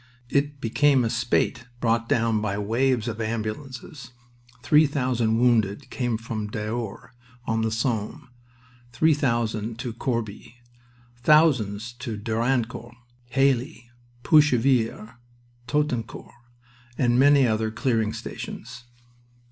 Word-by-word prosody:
It 145 +1 0
became 135 +3 +3
a 115 - -1
spate 120 +1 0
brought 115 -1 0
down 115 -2 +1
by 100 -2 -2
waves 115 +3 0
of 115 -1 -4
ambulances. 115 +4 -5 0.5
Three 150 +4 +5
thousand 125 -5 0
wounded 120 0 +1
came 120 -3 -1
to 110 -2 -5
Daours 110 +2 -5 0.3
on 110 0 0
the 110 - 0
Somme, 115 0 -3 0.6
three 160 +6 +3
thousand 115 -5 -1
to 120 -1 -5
Corbie, 115 -2 -4 0.6
thousands 120 -7 +3
to 115 -3 -5
Dernancourt, 115 +1 -2 0.3
Heilly, 130 -1 0 0.3
Puchevillers, 125 -7 +3 0.6
Toutencourt, 130 -4 -2 0.6
and 120 -1 +2
many 140 0 +6
other 110 -1 0
"clearing 110 -1 0
stations." 120 - -8
120 Hz, 105 wpm, -25 LUFS, 110-130 Hz, 0.6 s, many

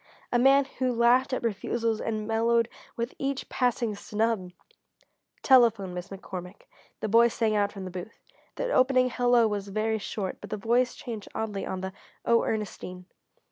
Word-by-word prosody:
A 240 - +3
man 270 +2 +5
who 255 -1 +2
laughed 245 +3 +3
at 255 - -2
refusals 225 +1 -1
and 215 -1 -2
mellowed 230 +1 +2 0.3
with 235 +1 -3
each 275 0 -2
passing 245 -3 0
snub! 210 -2 -1 0.9
"Telephone, 230 -8 +5
Miss 180 +1 -5
McCormick," 190 -1 -8 0.4
the - - -1
boy 230 +3 +6
sang 225 -2 0
out 205 -1 +2
from 195 -2 -7
the 185 - -6
booth. 185 +5 -8 0.3
The - - -2
opening 255 -1 +4
"Hello" 245 -1 +4
was 205 -2 -3
very 215 +2 -1
short, 195 -2 -4
but - - -9
the 215 - -3
voice 240 +5 +1
changed 230 -7 -7
oddly 210 -3 -3
on 185 - -4
the 190 0 -5 0.3
"Oh, 235 0 +4
Ernestine." 185 -4 -4
225 Hz, 165 wpm, -27 LUFS, 200-245 Hz, 0.9 s, boy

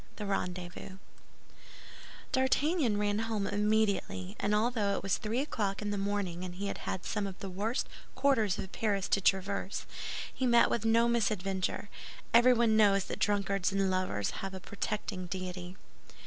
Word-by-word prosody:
THE 210 - -5
RENDEZVOUS 185 -1 -4 1.3
D'Artagnan 265 - +2
ran 205 0 +1
home 220 -3 -1
immediately, 205 - 0
and 210 +1 +1
although 215 -2 +1
it - - -4
was 195 -1 0
three 230 +3 -1
o'clock 205 -9 -2
in 205 -1 -2
the - - -1
morning 195 -3 -2
and 180 -1 -6
he 200 +2 -4
had 185 - -4
some 205 -2 -1
of 190 -1 -7
the 195 - -6
worst 215 +7 -1 0.3
quarters 225 -9 +2
of 190 - -6
Paris 200 -3 0
to 195 - +2
traverse, 195 +1 0 0.5
he 260 - 0
met 235 -1 +5
with 225 - 0
no 230 +1 +4
misadventure. 205 -5 0 0.5
Everyone 235 -2 +6
knows 200 -3 +5
that - - -6
drunkards 200 -2 +1
and 195 -1 +1
lovers 185 - -1
have 195 0 -4
a - - -5
protecting 190 -1 -4
deity. 180 0 -5
200 Hz, 155 wpm, -31 LUFS, 190-220 Hz, 1.3 s, Everyone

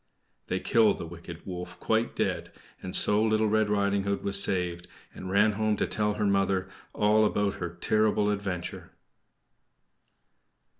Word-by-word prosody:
They - - -1
killed 115 -2 +3
the - - -6
wicked 85 0 -10
wolf 90 -1 -7
quite 110 +1 0
dead; - - -2 0.3
and 90 - -5
so 105 +1 +2
Little 110 0 +2
Red 110 0 +2
Riding 100 -1 +1
Hood 100 0 -2
was 100 0 +3
saved, 90 -2 -1 0.3
and 95 - -8
ran 105 +3 +4
home 110 +1 0
to - - +1
tell 105 -1 -1
her 105 - -1
mother 95 -1 +1 0.3
all 105 +1 +3
about 105 -1 +1
her 85 - -2
terrible 105 0 +2
adventure. 95 -4 -5
100 Hz, 150 wpm, -28 LUFS, 95-105 Hz, 0.3 s, ran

